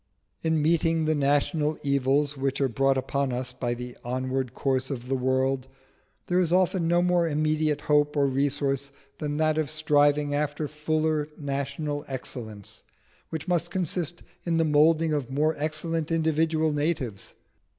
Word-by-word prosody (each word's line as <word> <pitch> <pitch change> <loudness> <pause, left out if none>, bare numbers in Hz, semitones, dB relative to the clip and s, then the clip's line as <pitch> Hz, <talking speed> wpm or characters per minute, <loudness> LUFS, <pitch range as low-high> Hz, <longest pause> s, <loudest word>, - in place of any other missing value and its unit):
In 160 -2 +1
meeting 165 0 +2
the 155 - +2
national 150 +2 +1
evils 140 +1 +1
which 135 0 -1
are 135 - +3
brought 135 +2 +2
upon 135 +1 -1
us 125 +1 -2
by 125 -1 -2
the 125 0 -7
onward 130 0 -2
course 130 -1 0
of 125 -3 -5
the 135 - -1
world, 130 0 0 0.6
there 180 - +1
is 175 -3 +1
often 180 -1 +2
no 175 +1 +3
more 175 -1 +2
immediate 155 -1 +1
hope 150 0 +2
or 140 - +4
resource 140 0 0 0.3
than 150 -1 -2
that 155 0 +2
of 155 - -1
striving 145 -1 +2
after 150 +1 -1
fuller 155 0 -1
national 145 +1 -3
excellence, 115 -6 -7 0.5
which 160 +1 -5
must 175 -1 +1
consist 175 -2 -2 0.2
in 170 -1 0
the 165 - +3
moulding 155 +1 +4
of 145 -5 -2
more 150 +4 +1
excellent 155 +1 -2
individual 160 -1 +1
natives. 145 - -2
150 Hz, 150 wpm, -26 LUFS, 135-160 Hz, 0.6 s, or